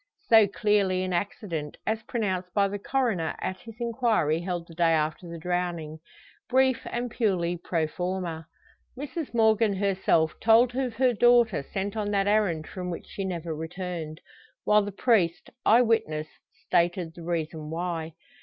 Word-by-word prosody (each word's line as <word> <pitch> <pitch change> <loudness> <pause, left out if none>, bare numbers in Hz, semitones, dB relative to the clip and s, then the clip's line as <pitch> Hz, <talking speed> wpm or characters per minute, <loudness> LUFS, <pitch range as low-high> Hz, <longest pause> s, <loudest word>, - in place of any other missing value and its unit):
So 220 -2 +7
clearly 200 -2 +1
an 185 -1 -2
accident, 175 -4 -3
as 220 0 -1
pronounced 190 -6 -2
by 200 -1 +4
the 200 +1 -5
coroner 225 -9 0
at 185 - -4
his 225 -2 -11
inquiry 225 - +1
held 175 -2 -4
the 165 - -12
day 165 0 +3
after 155 +2 -1
the 170 - -6
drowning 170 -2 -3 0.5
brief 260 -1 +3
and 240 0 -3
purely 185 -7 0
pro 170 -1 -1
forma. 175 -1 -4 0.5
Mrs 290 +3 -5
Morgan 220 -2 +3
herself 185 -5 +2
told 235 +2 +4
of 255 -3 -1
her 255 +1 +3
daughter 240 -5 +4
sent 195 +8 -4
on 210 -2 -2
that 200 -1 +1
errand 200 -7 +1
from 180 +1 -6
which 170 - -6
she 195 - -6
never 170 -3 -3
returned; 160 -1 -5 0.4
while 210 0 +4
the 205 0 -4
priest, 195 -5 +1 0.2
eye 235 +3 +7
witness, 220 -10 0 0.3
stated 170 -1 0
the 170 - -11
reason 160 -2 -3
why. 165 -1 -3
185 Hz, 155 wpm, -27 LUFS, 170-220 Hz, 0.5 s, So